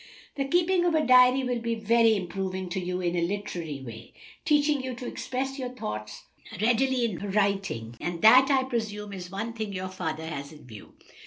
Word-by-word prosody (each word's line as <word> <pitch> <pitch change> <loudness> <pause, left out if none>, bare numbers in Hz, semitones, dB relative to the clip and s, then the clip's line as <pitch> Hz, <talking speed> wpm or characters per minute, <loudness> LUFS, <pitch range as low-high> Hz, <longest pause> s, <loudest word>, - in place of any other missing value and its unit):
"The 275 - -2
keeping 350 +4 +2
of 340 -2 +2
a 310 -1 +2
diary 255 +1 +6
will 250 -1 -1
be 230 0 -2
very 225 0 +3
improving 190 0 -4
to 190 +2 -2
you 180 0 -3
in 175 -1 -1
a 175 - +1
literary 170 -6 -4
way, 115 -1 -10 0.3
teaching 295 -2 +3
you 260 -1 -4
to 245 - -8
express 270 +2 -4
your 255 -1 -3
thoughts 105 - -6 0.4
readily 245 +3 +2
in 205 -7 -3
writing, 195 - -1
and 175 -1 -3
that, 255 +5 +8
I 270 -2 +3
presume, 215 -5 -4
is 180 -2 -7
one 220 +5 -4
thing 220 -3 -5
your 185 0 -4
father 160 -4 -4
has 140 -3 -6
in 150 -4 -14
view." 110 -5 -12
210 Hz, 190 wpm, -27 LUFS, 175-255 Hz, 0.4 s, that